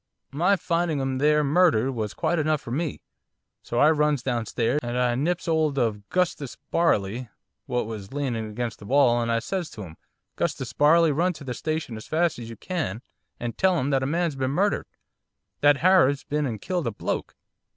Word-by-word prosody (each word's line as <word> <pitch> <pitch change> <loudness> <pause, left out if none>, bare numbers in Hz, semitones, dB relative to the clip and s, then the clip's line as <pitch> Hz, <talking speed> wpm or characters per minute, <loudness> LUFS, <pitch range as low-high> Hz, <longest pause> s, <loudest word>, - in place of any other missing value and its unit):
My 175 +8 +3
finding 170 -4 0
'im 135 -1 -1
there 150 +1 +3
murdered 145 -5 +3
was 110 -5 -4
quite 175 - 0
enough 155 0 +1
for 120 - -9
me. 155 +3 -2 0.6
So 120 - -5
I 150 +5 +6
runs 150 -4 +1
downstairs, 120 +1 0
and 120 0 -3
I 125 -1 +2
nips 170 +9 -1
'old 155 -3 +1
of 105 -5 -1
'Gustus 175 -7 -1
Barley, 120 - +1 0.4
what 125 -2 -1
was 105 -3 -7
leaning 125 -6 -2
against 115 +1 -4
the 100 - -11
wall, 125 -3 +4
and 115 0 -1
I 115 - +2
says 175 +7 -3
to 105 - -8
him, 80 -3 -11 0.4
"'Gustus - - -2
Barley, 160 +2 +5
run 175 +5 +1
to 155 - -11
the 130 -2 -4
station 155 -3 -3
as 110 - -10
fast 165 -3 +1
as 115 -1 -7
you 115 - -8
can 150 - -3 0.4
and 120 -1 -4
tell 190 -2 +3
'em 140 -1 0
that 135 -1 +2
a 130 - -1
man's 165 0 0
been 130 -1 -1
murdered, 195 +9 0 0.7
that 145 0 +5
Harab's 170 -6 +4
been 150 0 -1
and 110 -4 -4
killed 175 - -2
a - - 0
bloke." - - -4
140 Hz, 195 wpm, -25 LUFS, 120-160 Hz, 0.7 s, I